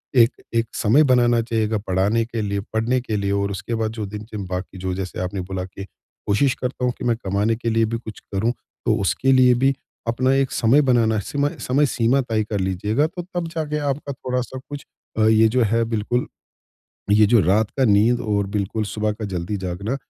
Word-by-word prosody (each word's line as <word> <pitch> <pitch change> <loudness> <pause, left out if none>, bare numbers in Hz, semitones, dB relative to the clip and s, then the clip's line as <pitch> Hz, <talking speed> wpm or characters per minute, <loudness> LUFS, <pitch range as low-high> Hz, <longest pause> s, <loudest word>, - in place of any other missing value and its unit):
एक, 115 -2 +7 0.3
एक 115 0 +2
समय 125 +8 +4
बनाना 120 -3 +4
चाहिए 115 -1 0
गा 110 0 0
पढ़ाने 100 +5 +2
के 115 -1 -4
लिए, 100 -1 -1
पढ़ने 115 +3 +1
के 110 -3 -3
लिए 100 0 -1
और 100 0 0
उसके 100 +4 -4
बाद 110 -1 -1
जो 110 -2 -4
दिन 105 0 -7
बाकी 90 +1 -5
जो 95 0 -2
जैसे 95 -2 -5
आपने 90 +1 -3
बोला 90 0 -4
कि 95 +1 -9 0.4
कोशिश 130 +6 +3
करता 125 0 -2
हूँ 125 - +2
कि - - -8
मैं 120 -1 +2
कमाने 100 +4 +1
के 115 +1 -3
लिए 115 0 +2
भी 115 +1 -2
कुछ 110 -2 -9
करूँ। 105 +5 +1 0.3
तो 115 -3 +3
उसके 100 +9 +1
लिए 130 -1 +6
भी 135 0 +4 0.3
अपना 130 +3 +2
एक 135 -1 +1
समय 125 +6 +4
बनाना 110 -3 +3
सीमा 145 +8 -1 0.2
समय-सीमा 130 -1 +2
तय 115 -4 -1
कर 105 -1 -3
लीजिएगा, 105 - 0
तो 175 +2 -7
तब 175 -2 -2
जाके 155 -3 -3
आपका 140 +1 -5
थोड़ा-सा 125 0 -4
कुछ 145 -1 -7 0.3
अ, - - +3
ये 110 0 +5
जो 120 +2 +2
है 115 +2 +2
बिल्कुल 115 +2 -1 0.8
ये 105 +1 +6
जो 115 0 +5
रात 100 +5 +2
का 135 - +4
नींद 110 +2 +4
और 105 -4 0
बिल्कुल 105 +2 -1
सुबह 105 0 -1
का 110 +1 -7
जल्दी 90 +4 -2
जागना 100 +8 -3
110 Hz, 205 wpm, -22 LUFS, 100-125 Hz, 0.8 s, एक